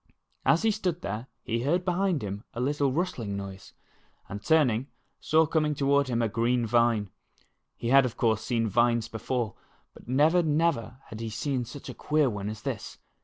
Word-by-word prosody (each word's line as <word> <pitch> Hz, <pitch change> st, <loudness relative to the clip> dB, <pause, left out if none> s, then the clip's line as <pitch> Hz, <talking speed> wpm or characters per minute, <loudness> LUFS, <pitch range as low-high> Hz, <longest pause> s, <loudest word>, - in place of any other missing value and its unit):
As 165 Hz, -, +4 dB
he 225 Hz, -, +4 dB
stood 185 Hz, -5 st, -2 dB
there, 105 Hz, +5 st, -4 dB, 0.2 s
he 115 Hz, 0 st, -1 dB
heard 175 Hz, +8 st, +1 dB
behind 180 Hz, -, +1 dB
him 100 Hz, +1 st, -5 dB
a -, -, -4 dB
little 140 Hz, +1 st, +1 dB
rustling 130 Hz, -, -2 dB
noise, 100 Hz, -1 st, -8 dB, 0.5 s
and 100 Hz, +1 st, -7 dB
turning, 135 Hz, -6 st, +3 dB, 0.3 s
saw 160 Hz, +1 st, +3 dB
coming 155 Hz, -1 st, +1 dB
toward 140 Hz, 0 st, +2 dB
him 120 Hz, -2 st, 0 dB
a -, -, +2 dB
green 120 Hz, +3 st, +1 dB
vine. 115 Hz, -3 st, +2 dB, 0.7 s
He 115 Hz, -, -3 dB
had, 135 Hz, +1 st, +7 dB
of 125 Hz, -3 st, -3 dB
course, 110 Hz, -3 st, +2 dB
seen 115 Hz, 0 st, 0 dB
vines 120 Hz, +1 st, +2 dB
before, 115 Hz, -1 st, -2 dB, 0.4 s
but -, -, -16 dB
never, 150 Hz, +8 st, +4 dB
never 150 Hz, -7 st, 0 dB
had 110 Hz, -, -8 dB
he 115 Hz, 0 st, -4 dB
seen 125 Hz, +3 st, -2 dB
such 130 Hz, +4 st, -10 dB
a -, -, -6 dB
queer 150 Hz, -4 st, +1 dB
one 100 Hz, -1 st, -4 dB
as 110 Hz, 0 st, -7 dB
this. -, -, -5 dB
125 Hz, 180 wpm, -28 LUFS, 110-150 Hz, 0.7 s, had